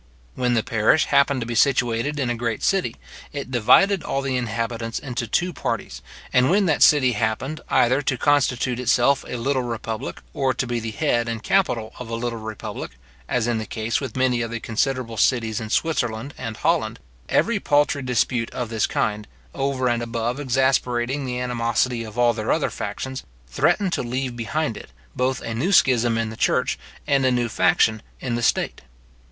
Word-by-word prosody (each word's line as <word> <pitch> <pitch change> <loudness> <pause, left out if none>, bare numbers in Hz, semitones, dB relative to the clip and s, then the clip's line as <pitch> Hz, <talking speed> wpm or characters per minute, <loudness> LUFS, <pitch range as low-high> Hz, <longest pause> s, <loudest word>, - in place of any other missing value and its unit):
When 125 -1 0
the 110 - +2
parish 115 +8 +3
happened 140 -2 +3
to - - -2
be 120 - -4
situated 125 +3 +2
in 125 -3 0
a - - -1
great 115 -2 -3
city, 195 -2 +1 0.4
it 140 -3 -6
divided 190 - +4
all 135 - -2
the 135 -1 -1
inhabitants 115 -1 -2
into 125 -3 -4
two 175 - 0
parties; - - -4 0.3
and 125 +1 +4
when 200 +2 +3
that 160 -4 +1
city 135 -4 +6
happened, 115 +7 -2
either 130 +4 +3
to 135 -2 -1
constitute 130 -3 +1
itself 125 +2 +3
a 125 - -4
little 130 +3 0
republic, 115 0 -4
or 135 -2 0
to - - -1
be 120 -1 -2
the 115 0 -4
head 115 +2 0
and 115 -1 -4
capital 125 - +1
of 125 -2 -7
a 115 - -2
little 115 0 -3
republic, 110 - -6 0.4
as 120 -3 +1
in 120 -2 0
the 110 - -5
case 110 +2 -2
with 130 -3 -5
many 130 -2 +2
of 115 - -2
the 115 0 -4
considerable 115 +1 -2
cities 115 -2 +1
in 110 - -6
Switzerland 125 -3 -1
and 115 -3 -6
Holland, - - 0 0.3
every 230 -3 +2
paltry 145 -4 +2
dispute 125 -2 0
of 125 -3 -4
this 110 -1 0
kind, 105 -1 -1 0.3
over 135 -2 -1
and 120 -1 +1
above 120 +2 -2
exasperating 130 0 +1
the 125 0 -3
animosity 120 0 0
of 110 0 -10
all 120 -1 +4
their 110 -1 -2
other - - +1
factions, 130 0 -5 0.2
threatened 175 - +1
to - - 0
leave 125 +1 -3
behind 120 +1 -2
it, - - -11 0.3
both 130 0 0
a 115 - -4
new 140 - 0
schism 120 - +4
in 115 -1 -1
the - - -8
church, - - +1 0.3
and 140 -2 +2
a 130 - +4
new 120 -1 +1
faction 110 -1 +2 0.2
in 125 - -3
the 120 - -1
state. 120 - 0
120 Hz, 190 wpm, -23 LUFS, 115-135 Hz, 0.4 s, city